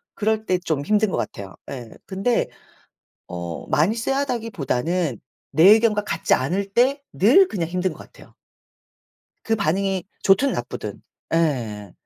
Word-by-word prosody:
그럴 220 0 0
때 185 - +2
좀 155 -5 -2
힘든 215 +2 +2
것 - - -1
같아요 100 -1 -5 0.2
예. 120 -4 -7 0.2
근데 200 +5 0 0.8
어 85 -1 -6
많이 175 +10 +2
쎄하다기보다는 185 - -1 0.3
내 160 - +3
의견과 215 -1 +4
같지 - - +1
않을 190 +9 -1
때 265 +6 +2
늘 275 - +5
그냥 170 -6 -3
힘든 180 +1 -1
것 - - -13
같아요. - - -15 1.1
그 225 - +1
반응이 195 0 0 0.2
좋든 200 +9 +4
나쁘든. - - -5 0.3
예. 115 - -1
190 Hz, 255 characters per minute, -22 LUFS, 150-220 Hz, 1.1 s, 늘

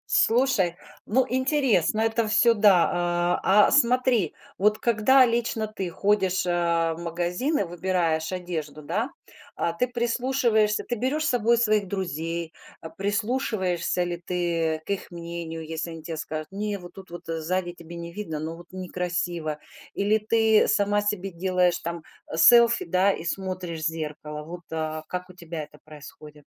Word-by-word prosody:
Слушай, 225 -8 +3 0.3
ну, 255 +4 +3
интересно 260 - +1
это 225 0 +1
всё, 230 +2 +5
да. 205 -5 +5 0.5
А 205 +2 +5
а - - -1
смотри, 250 - +3 0.2
вот 210 +2 +3
когда 240 +4 +4
лично 230 -2 -1
ты 195 -4 -5
ходишь 190 0 +1
а 170 -1 +1
в 165 - -9
магазин 175 - -1
и - - +1
выбираешь 175 -2 -1
одежду, 160 -5 -5
да, - - -1 0.5
а 170 - -1
ты 250 +9 0
прислушиваешься, 235 -3 +1
ты 240 - -3
берешь 285 +6 -1
с - - +2
собой 235 -1 +3
своих 215 -4 +2
друзей, 170 -3 -3 0.3
а 160 - -8
прислушиваешься 200 -4 -1
ли 175 0 -4
ты 165 -3 -1
к - - -18
их 200 - -3
мнению, 170 -1 -6
если 160 +1 -4
они 165 -1 -9
те 165 0 -5
скажут 155 +1 -5
не, 205 +1 -3
вот 175 -2 -12
тут 190 -2 -12
вот 175 0 -9
сзади 175 +2 -2
тебе 170 0 -11
не 170 0 -7
видно, 170 -6 -5
но 160 +2 -5
вот 170 +1 -13
некрасиво. 175 -4 -3 0.4
Или 210 +2 +2
ты 220 0 +3
сама 205 -1 +2
себе 200 -2 -2
делаешь 180 0 +1
там 170 -1 -5 0.3
э 160 - -4
селфи, 235 +6 +6
да, 185 +3 +3
и 165 - -7
смотришь 185 -2 -3
в 155 - 0
зеркало. 150 -1 -5
Вот 175 +3 -8
а 155 -1 -3
как 180 0 -5
у - - -16
тебя 170 -3 -6
это 150 0 -15
происходит? 150 -1 -13
180 Hz, 160 wpm, -25 LUFS, 165-215 Hz, 0.5 s, селфи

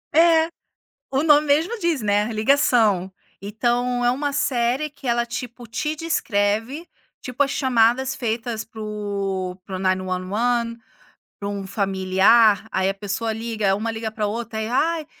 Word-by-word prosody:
É, 325 0 +5 0.6
o 270 +1 +1
nome 300 -1 +5
mesmo 320 +11 +1
diz, 335 -5 0
né, 210 +2 +1
ligação. 215 -5 +2 0.3
Então 240 +4 0
é 240 - +4
uma 285 +3 -1
série 260 +1 0
que 275 -2 -12
ela, 235 0 +2
tipo, 240 0 -7
te 300 +7 -3
descreve, 245 -1 -1 0.3
tipo, 250 +2 -1
as 275 - 0
chamadas 255 0 +2
feitas 225 -1 -3
para 225 -1 -12
o 200 -3 -3
para 190 - -6
o - - -5
911 190 +6 -1 0.6
para 200 - -3
um 200 -1 -4
familiar, 195 +3 +3
aí 190 0 +1
a 195 - -1
pessoa 205 +3 -3
liga 220 -3 -1
uma 225 +2 -3
liga 220 0 -4
pra 215 -1 -2
outra, 225 +1 -4
e 215 - -2
aí: - - -7
"Ai, 320 +3 +1
230 Hz, 155 wpm, -22 LUFS, 205-260 Hz, 0.6 s, É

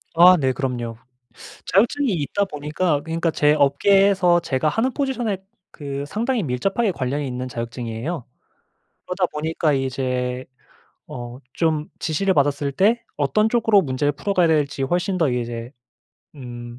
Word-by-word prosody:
아 180 +2 +8
네 130 -2 +2
그럼요. 120 -3 -3 0.7
자격증이 230 +6 +2
있다 175 +5 -1
보니까 150 -1 -1
그러니까 165 +1 -1
제 150 -1 +3
업계에서 180 +5 +4
제가 155 -2 0
하는 230 - 0
포지션에 245 -7 -1 0.3
그 140 -2 -6
상당히 230 - -1
밀접하게 195 - 0
관련이 140 0 -2
있는 125 0 -4
자격증이에요. 120 +4 -5 0.8
그러다 180 0 0
보니까 155 0 0
이제 130 -1 -2 0.6
어 120 0 -8
좀 155 -2 0
지시를 185 +5 0
받았을 140 0 +1
때 220 - +2
어떤 215 +10 +2
쪽으로 225 -3 +4
문제를 145 -1 0
풀어가야 180 +4 +1
될지 145 -3 +1
훨씬 180 +6 0
더 160 -5 +2
이제 120 -1 -4 0.6
음 120 -3 -9
150 Hz, 310 characters per minute, -22 LUFS, 130-190 Hz, 0.8 s, 아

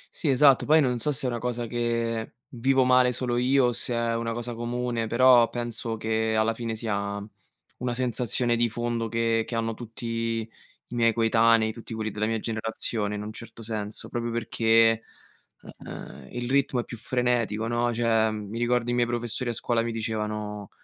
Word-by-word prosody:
Sì, 155 - 0
esatto, 135 0 +5
poi 155 +1 +6
non 125 -5 +1
so 150 - 0
se 135 - -1
è - - +2
una 120 - -3
cosa 120 0 -2
che 115 -1 -2
vivo 130 +2 +2
male 125 0 +5
solo 120 0 -1
io, 130 +2 +3
o 120 - +1
se 120 +1 -3
è 115 0 0
una 115 0 -2
cosa 120 +1 -4
comune, 120 0 -2
però 120 0 +6
penso 120 -1 -3
che, 110 0 0
alla 110 +1 +2
fine, 115 -1 -4
sia 100 -2 -2 0.6
una 125 -1 -2
sensazione 120 -1 +1
di 120 0 +2
fondo 120 0 -2
che 115 0 +1
che 120 - -6
hanno 115 0 -1
tutti 115 +1 -9
i 115 -1 -2 0.5
miei 115 -1 +3
coetanei, 115 0 +3
tutti 115 0 -8
quelli 110 -1 -3
della 105 +1 -1
mia 115 0 0
generazione, 110 -1 -2
in 105 - -4
un 105 - -6
certo 115 0 -8
senso, 105 -1 -4
proprio 120 0 -3
perché, 115 -1 +3 0.8
uhm, 65 0 -9
il 120 0 -4
ritmo 135 -1 +1
è - - -8
più 120 - -8
frenetico, 120 -3 0
no, 120 +1 0
cioè, 115 -1 +2
mi 110 +1 -5
ricordo 120 0 +1
i - - 0
miei 120 -1 +2
professori 120 +1 -1
a - - -1
scuola 115 0 0
mi 115 - -2
dicevano 105 -2 -4
115 Hz, 185 wpm, -26 LUFS, 110-120 Hz, 0.8 s, poi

